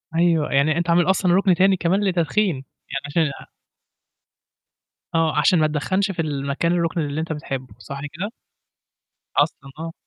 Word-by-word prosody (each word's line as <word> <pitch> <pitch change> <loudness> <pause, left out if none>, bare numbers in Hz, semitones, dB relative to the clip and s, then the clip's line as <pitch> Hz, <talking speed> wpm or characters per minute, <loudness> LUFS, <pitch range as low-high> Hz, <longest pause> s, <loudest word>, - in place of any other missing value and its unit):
أيوه، 165 -3 +2
يعني 150 +3 +3
أنت 170 0 -1
عامل 175 +2 +4
أصلًا 190 -2 +3
رُكن 190 -1 +4
تاني 190 +2 +4
كمان 185 +4 +1
لتتدخين 185 +1 +1
يعني 135 +1 -8
عشان 150 0 +1 1.8
آه، 160 -2 +2
عشان 170 +3 +4
ما 155 - +4
تدخَّنش 185 +7 0
في 170 -3 -2
المكان 145 +2 -1
الرُكن 170 -1 0
اللي 145 0 -2
أنت 160 0 -3
بتحبه، 130 -6 -6
صح 140 +3 -7
كده؟ 200 +7 -4 1.1
أصلًا، 135 - 0
آه. 165 0 -5
165 Hz, 150 wpm, -22 LUFS, 150-180 Hz, 1.8 s, عامل